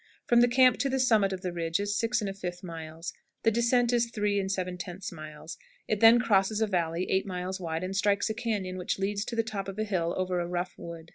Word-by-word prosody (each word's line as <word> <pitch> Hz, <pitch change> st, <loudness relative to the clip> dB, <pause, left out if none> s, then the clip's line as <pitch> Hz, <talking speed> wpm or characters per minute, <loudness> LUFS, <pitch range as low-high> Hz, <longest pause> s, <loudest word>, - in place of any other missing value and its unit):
From 240 Hz, 0 st, +5 dB
the 245 Hz, -, +6 dB
camp 250 Hz, 0 st, +5 dB
to 275 Hz, -, +1 dB
the 265 Hz, 0 st, 0 dB
summit 220 Hz, -6 st, +3 dB
of 190 Hz, -1 st, -4 dB
the 180 Hz, -1 st, -3 dB
ridge 165 Hz, +1 st, -1 dB
is 205 Hz, 0 st, -1 dB
6 230 Hz, +1 st, +1 dB
1/5 195 Hz, -3 st, -5 dB
miles. 165 Hz, -1 st, -7 dB, 0.3 s
The 225 Hz, -, +4 dB
descent 235 Hz, +1 st, +2 dB
is 235 Hz, -1 st, +2 dB
3 210 Hz, -2 st, 0 dB
7/10 185 Hz, -1 st, -4 dB
miles. 155 Hz, 0 st, -9 dB, 0.3 s
It 215 Hz, -, 0 dB
then 225 Hz, +2 st, +8 dB
crosses 210 Hz, -2 st, +2 dB
a 220 Hz, -, +3 dB
valley 175 Hz, -3 st, -1 dB
8 190 Hz, +1 st, +1 dB
miles 185 Hz, +1 st, -4 dB
wide, 165 Hz, -1 st, -3 dB
and 190 Hz, +1 st, -3 dB
strikes 200 Hz, 0 st, +2 dB
a 220 Hz, -, -1 dB
cañon 210 Hz, -6 st, -3 dB
which 180 Hz, -, -2 dB
leads 200 Hz, +1 st, -1 dB
to 235 Hz, -, -5 dB
the 230 Hz, -, +2 dB
top 210 Hz, -3 st, -4 dB
of 195 Hz, 0 st, -6 dB
a 215 Hz, -, 0 dB
hill 180 Hz, -5 st, -1 dB
over 185 Hz, -1 st, 0 dB
a 175 Hz, -, -2 dB
rough 175 Hz, +1 st, -3 dB
road. 170 Hz, -1 st, -9 dB
195 Hz, 230 wpm, -29 LUFS, 180-220 Hz, 0.3 s, then